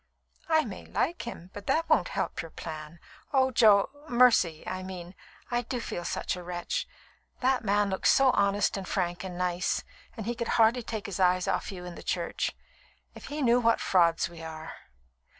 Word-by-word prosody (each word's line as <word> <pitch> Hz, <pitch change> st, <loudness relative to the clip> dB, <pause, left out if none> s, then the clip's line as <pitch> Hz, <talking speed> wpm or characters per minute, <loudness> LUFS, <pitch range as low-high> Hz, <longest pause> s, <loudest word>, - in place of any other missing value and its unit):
"I 315 Hz, -1 st, +4 dB
may 205 Hz, -5 st, -8 dB
like 340 Hz, -7 st, -1 dB
him, 185 Hz, -6 st, -8 dB
but 205 Hz, -1 st, -9 dB
that 330 Hz, +1 st, +2 dB
won't -, -, +3 dB
help -, -, -2 dB
your 165 Hz, -, -9 dB
plan. 155 Hz, 0 st, -8 dB, 0.3 s
Oh, 265 Hz, -2 st, +3 dB
Jo 210 Hz, -4 st, +5 dB, 0.2 s
Mercy, 235 Hz, -10 st, +4 dB
I 185 Hz, 0 st, -4 dB
mean, 185 Hz, -1 st, -7 dB, 0.4 s
I 240 Hz, 0 st, +1 dB
do 245 Hz, +1 st, -4 dB
feel 175 Hz, -6 st, -4 dB
such -, -, -2 dB
a 180 Hz, -, -7 dB
wretch! 175 Hz, 0 st, -3 dB, 0.5 s
That 260 Hz, 0 st, +2 dB
man 205 Hz, -1 st, +2 dB
looks 190 Hz, -, +2 dB
so 270 Hz, -1 st, +6 dB
honest 200 Hz, -2 st, +2 dB
and 190 Hz, -1 st, -6 dB
frank 175 Hz, -2 st, -1 dB
and 180 Hz, -2 st, -6 dB
nice, 180 Hz, 0 st, 0 dB, 0.3 s
and 220 Hz, -, -5 dB
he 240 Hz, -, -1 dB
could 235 Hz, -1 st, -4 dB
hardly 230 Hz, +2 st, +5 dB
take 220 Hz, -2 st, -5 dB
his 200 Hz, -2 st, -5 dB
eyes 180 Hz, 0 st, +3 dB
off -, -, -1 dB
you 180 Hz, -2 st, -8 dB
in 175 Hz, -1 st, -8 dB
church. -, -, -1 dB, 0.6 s
If -, -, -11 dB
he 295 Hz, 0 st, -3 dB
knew 240 Hz, 0 st, +5 dB
what 230 Hz, -1 st, +3 dB
frauds 170 Hz, -3 st, +3 dB
we 170 Hz, -1 st, -11 dB
are!" 160 Hz, -1 st, -7 dB
195 Hz, 185 wpm, -29 LUFS, 175-240 Hz, 0.6 s, so